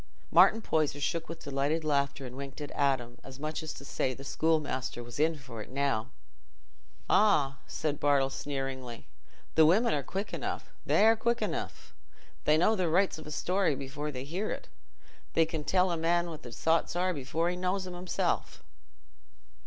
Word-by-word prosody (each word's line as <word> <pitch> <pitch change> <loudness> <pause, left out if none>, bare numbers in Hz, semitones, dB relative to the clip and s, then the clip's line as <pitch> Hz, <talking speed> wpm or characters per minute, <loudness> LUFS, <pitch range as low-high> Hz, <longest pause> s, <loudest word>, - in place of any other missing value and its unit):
Martin 225 - +6
Poyser 150 -2 +1
shook 165 +3 -1
with 165 0 -7
delighted 140 +3 0
laughter 140 -2 0
and 125 0 -8
winked 140 +1 -7
at 145 -1 -6
Adam, 130 -4 0
as 135 0 -10
much 155 +2 -3
as 155 0 -5
to 140 - -9
say 130 -2 -1
the 135 - -10
schoolmaster 145 -5 0
was 120 +3 -8
in 160 +1 +2
for 125 -5 -9
it - - -9
now. 130 -4 0 1.0
"Ah!" 145 -10 +3
said 150 -2 -2
Bartle 140 -2 +3
sneeringly, 135 -4 -4 0.5
"the 160 - +6
women 215 +9 +4
are 145 - +1
quick 195 +9 -4
enough—they're 225 +2 +1
quick 235 +1 0
enough. - - -4 0.5
They 150 +1 +5
know 215 +7 +4
the 180 -4 +1
rights 180 0 +2
of 155 - -10
a - - -7
story 180 0 +1
before 140 +3 -5
they 130 -2 -5
hear 180 +9 -3
it, - - -5 0.7
and 165 -1 +4
can 160 -2 -4
tell 185 +3 +2
a 170 - 0
man 170 +1 +1
what 155 - -9
his 120 -1 -9
thoughts 165 +1 +2
are 180 +1 +1
before 160 +4 -1
he - - -3
knows 185 +1 -1
'em 180 - -6
himself." 180 +1 -2
155 Hz, 175 wpm, -30 LUFS, 135-175 Hz, 1.0 s, Martin